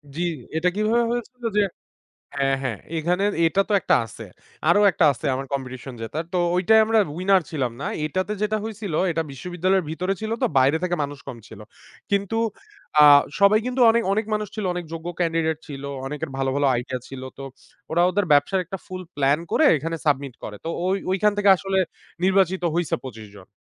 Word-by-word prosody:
জি, 170 - -3 0.4
এটা 180 +3 +2
কিভাবে 220 +3 +2
হয়েছিল 240 +1 -5
যে - - +6 0.7
হ্যাঁ, 135 -1 +1
হ্যাঁ, 125 -5 -2 0.2
এখানে 175 +4 0 0.2
এটা 165 +4 +3
তো - - +1
একটা - - +3
আছে 110 - -10 0.4
আরো - - +5
একটা 165 -1 +2
আছে 125 - -8
আমার 135 - -4
কম্পিটিশন 130 -1 -5
জেতার 150 +9 -4
তো - - +1 0.2
ওইটাই 195 +5 +5
আমরা 225 0 +3 0.2
উইনার 190 +1 +3
ছিলাম 130 -6 -1
না। - - -3 0.2
এটাতে 185 +7 -2
যেটা 215 +1 +1
হয়েছিল 215 -5 -5 0.2
এটা 165 0 -1
বিশ্ববিদ্যালয়ের 180 +6 -1
ভিতরে 180 +4 -1
ছিল 220 0 -3
তো - - +4
বাইরে 135 +4 +4
থেকে 180 -1 0
মানুষ 145 0 -6
কম 130 -3 -6
ছিল। 110 - -12 0.5
কিন্তু 200 +1 0 0.7
আ - - +9 0.4
সবাই 200 +2 +6
কিন্তু 250 0 -1
অনেক, 230 +1 +3
অনেক 215 +2 0
মানুষ 210 0 -1
ছিল 215 -3 -3
অনেক 175 -1 -4
যোগ্য 165 +1 -6
ক্যান্ডিডেট 165 -2 0
ছিল, 140 -2 -8 0.2
অনেকের 150 +3 -4
ভালো, 135 0 0
ভালো 140 0 +2
আইডিয়া 125 +1 -3
ছিল 135 -1 -8 0.2
তো 135 - -8 0.5
ওরা 170 +2 +2
ওদের 200 +2 0
ব্যবসার 145 +7 +3
একটা 195 +3 -6
ফুল 185 0 -6
প্লান 140 +1 +2
করে - - +4
এখানে 165 +4 -3
সাবমিট 140 -3 0
করে। 105 - -6
তো - - -2 0.2
ওই 190 - +1
ওইখান 210 +2 +3
থেকে 205 -1 +4
আসলে 195 +1 -2 0.5
নির্বাচিত 190 -1 +2
হইছে 170 -5 0
২৫ 110 -4 -9
জন। 95 - -15
175 Hz, 190 wpm, -23 LUFS, 140-200 Hz, 0.7 s, আ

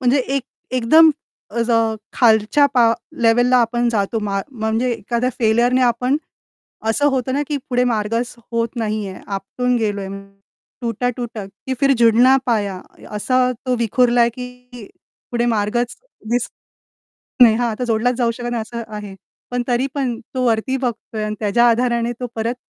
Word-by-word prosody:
म्हणजे 255 +2 +3 0.2
एक 275 - -1 0.3
एकदम 315 +7 +6 0.5
अज 235 +1 0 0.4
खालच्या 225 +4 +4
पा 235 -2 +5 0.3
लेव्हलला 245 +2 +4
आपण 240 0 +2
जातो, 220 -1 0
मा 200 -2 -2
म्हणजे 225 0 -1
एखाद्या 235 +3 -1
फेल्युरने 240 +3 +3
आपण 250 +3 +2 0.7
असं 285 +6 +2
होतं 260 -1 -1
ना 285 - +1
की 295 - -1
पुढे 250 -1 +2
मार्गच 230 +1 -1 0.2
होत 230 +1 -1
नाहीये, 215 -4 -3
आपटून 225 +6 -2
गेलोय, 205 -3 -2 0.7
टुटा-टुटा 235 -2 -3
की 200 +7 -7
फिर 275 0 +4
झुडना 240 +3 +5
पाया 205 -6 0 0.4
असा 255 +5 +1 0.3
तो 255 -1 +1
विखुरला, 235 +1 +3
की 250 -1 -9 0.4
पुढे 240 0 0
मार्गच 225 +3 -1 0.4
दिसत 245 0 0 0.9
नाही. 225 -2 +6
हां, 240 +1 0
आता 220 +3 -4
जोडलाच 240 +1 +1
जाऊ 235 -2 +2
शकत 240 +1 -5
नाही 235 -2 -1
असं 235 +1 -6
आहे. 205 -2 -7 0.4
पण 245 0 -1
तरी 250 +2 +1
पण 255 -5 -2
तो 255 -1 -1
वरती 235 +3 +1
बघतोय 225 -2 -3
आणि 215 0 -3
त्याच्या 230 +3 +3
आधाराने 235 0 +1
तो 250 - -3
परत 230 +2 -1
235 Hz, 150 wpm, -19 LUFS, 220-250 Hz, 0.9 s, एकदम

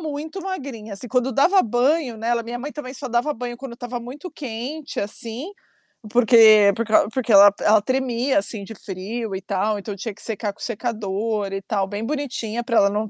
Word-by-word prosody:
muito 315 +4 -5
magrinha 270 - -6
assim, 215 +5 -7
quando 255 +1 +1
dava 365 - +4
banho 245 +3 +1
nela 235 +2 0
minha 240 +1 -5
mãe 285 +4 -5
também 275 -4 -7
só 260 0 -6
dava 240 +6 +1
banho 240 -2 -6
quando 260 -1 -8
estava 245 0 -5
muito 270 +9 -8
quente, 270 +3 -5
assim, 230 - -4 0.6
porque 220 -3 +7
por 230 - -1
crau 215 -2 +4
porque 250 -1 -1
ela 200 0 +9
ela 215 0 +5
tremia, 255 +2 0
assim, 200 +1 -3
de 220 +3 -9
frio 200 +3 -5
e 190 - -4
tal, 205 +2 -1
então 200 0 -6
tinha 205 +3 -5
que 200 - -13
secar 215 -2 -3
com - - -28
o - - -9
secador 215 -3 -2
e 195 - -3
tal, 195 -2 -1
bem 205 +2 -4
bonitinha 240 -5 -3
pra 235 -1 0
ela 200 - +5
não, 210 +1 -2
235 Hz, 200 wpm, -22 LUFS, 210-260 Hz, 0.6 s, ela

